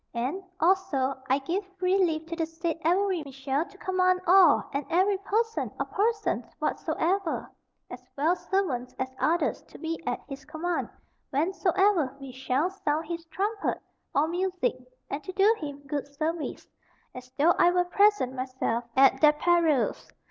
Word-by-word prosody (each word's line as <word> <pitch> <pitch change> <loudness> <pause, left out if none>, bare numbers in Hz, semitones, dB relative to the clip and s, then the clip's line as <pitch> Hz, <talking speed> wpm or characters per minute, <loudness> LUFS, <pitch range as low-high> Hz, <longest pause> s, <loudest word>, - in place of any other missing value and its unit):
And, 260 +11 -2 0.2
also, 330 -7 +2 0.2
I 265 - +4
give 340 +9 -2
free 375 +1 +2
leave 320 -2 0
to 335 +1 -5
the 325 -1 -1
said 330 0 -3
Avery 365 +1 +2
Mitchell 275 +2 -2
to 395 - -17
command 370 -1 +2
all 360 -3 +6
and 280 +1 -1
every 380 +3 +2
person 450 +3 -1
or - - 0
persons 430 +1 0
whatsoever, 365 0 -1 0.4
as 250 0 -10
well 320 +5 +3
servants 290 -12 -2
as 260 0 -3
others, 340 +2 +1
to - - -13
be 330 0 -4
at 245 - -1
his 275 0 -8
command 345 +2 -3 0.4
whensoever 360 +2 +2
be 270 -1 -8
shall 265 +6 -1
sound 315 -5 -1
his 335 -1 -4
trumpet 405 +5 -2 0.4
or 295 +3 +3
music, 370 +6 0 0.3
and 285 +2 -5
to 375 - -6
do 400 +4 +4
him 285 -2 -7
good 285 0 -3
service, 310 +3 -3 0.5
as 255 0 -10
though 320 +4 +5
I 345 - +6
were 355 0 +2
present 400 -8 +3
myself, 255 -2 -2
at 270 0 +5
their 300 -1 +7
perils. 325 -3 +1
330 Hz, 155 wpm, -27 LUFS, 280-375 Hz, 0.5 s, their